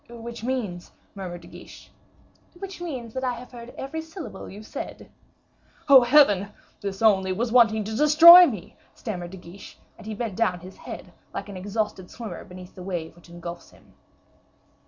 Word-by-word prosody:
"Which 235 Hz, 0 st, -9 dB
means 225 Hz, -9 st, -3 dB
" -, -, -37 dB
murmured 180 Hz, -3 st, -7 dB
De -, -, -14 dB
Guiche. -, -, -14 dB, 0.7 s
"Which 385 Hz, 0 st, -8 dB
means 255 Hz, -10 st, -6 dB
that 260 Hz, -, -4 dB
I 250 Hz, -1 st, 0 dB
have 245 Hz, +2 st, -11 dB
heard 240 Hz, -1 st, -10 dB
every 300 Hz, +4 st, -5 dB
syllable 320 Hz, -, -9 dB
you 200 Hz, +2 st, -10 dB
have -, -, -14 dB
said." -, -, -8 dB, 0.8 s
"Oh, 275 Hz, -2 st, +9 dB
Heaven! 240 Hz, -7 st, +5 dB, 0.3 s
this 200 Hz, +1 st, -5 dB
only 190 Hz, -3 st, +4 dB
was 225 Hz, +5 st, -2 dB
wanting 225 Hz, -3 st, +4 dB
to 215 Hz, +2 st, -5 dB
destroy 330 Hz, +6 st, +9 dB
me," 210 Hz, -9 st, -7 dB, 0.2 s
stammered 180 Hz, -6 st, -6 dB
De 190 Hz, -, -10 dB
Guiche; 180 Hz, +2 st, -13 dB, 0.2 s
and -, -, -12 dB
he 220 Hz, -, -4 dB
bent 220 Hz, -3 st, -4 dB
down 180 Hz, -6 st, 0 dB
his 185 Hz, +2 st, -11 dB
head, -, -, -10 dB, 0.2 s
like -, -, -5 dB
an 195 Hz, -, -7 dB
exhausted 205 Hz, -1 st, -3 dB
swimmer 220 Hz, -7 st, -8 dB
beneath 180 Hz, 0 st, -12 dB
the 185 Hz, -, -11 dB
wave 175 Hz, -4 st, -5 dB
which 175 Hz, 0 st, -19 dB
engulfs 170 Hz, 0 st, -9 dB
him. -, -, -22 dB
215 Hz, 180 wpm, -25 LUFS, 185-250 Hz, 0.8 s, Oh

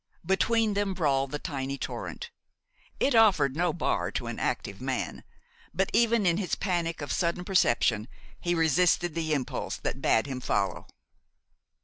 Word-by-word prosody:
Between 220 Hz, +4 st, +2 dB
them 200 Hz, -1 st, -1 dB
brawled 140 Hz, -5 st, +1 dB
the 150 Hz, -, -3 dB
tiny 140 Hz, -2 st, -4 dB
torrent. 475 Hz, -, -6 dB, 0.7 s
It 280 Hz, -, +2 dB
offered 205 Hz, -, +4 dB
no 175 Hz, +1 st, +1 dB
bar 165 Hz, -, -1 dB
to -, -, -3 dB
an -, -, -5 dB
active -, -, -3 dB
man; -, -, -3 dB, 0.5 s
but -, -, 0 dB
even 230 Hz, -2 st, +3 dB
in 170 Hz, -1 st, +3 dB
his 195 Hz, -3 st, -1 dB
panic 170 Hz, -4 st, -2 dB
of 145 Hz, -, -4 dB
sudden 175 Hz, +1 st, -1 dB
perception 120 Hz, -, +2 dB, 0.3 s
he 175 Hz, 0 st, 0 dB
resisted 165 Hz, +1 st, +2 dB
the 160 Hz, -1 st, -2 dB
impulse 135 Hz, -3 st, -3 dB
that -, -, -4 dB
bade 110 Hz, -, +3 dB
him 135 Hz, -2 st, -4 dB
follow. 100 Hz, -5 st, -1 dB
170 Hz, 150 wpm, -28 LUFS, 140-190 Hz, 0.7 s, offered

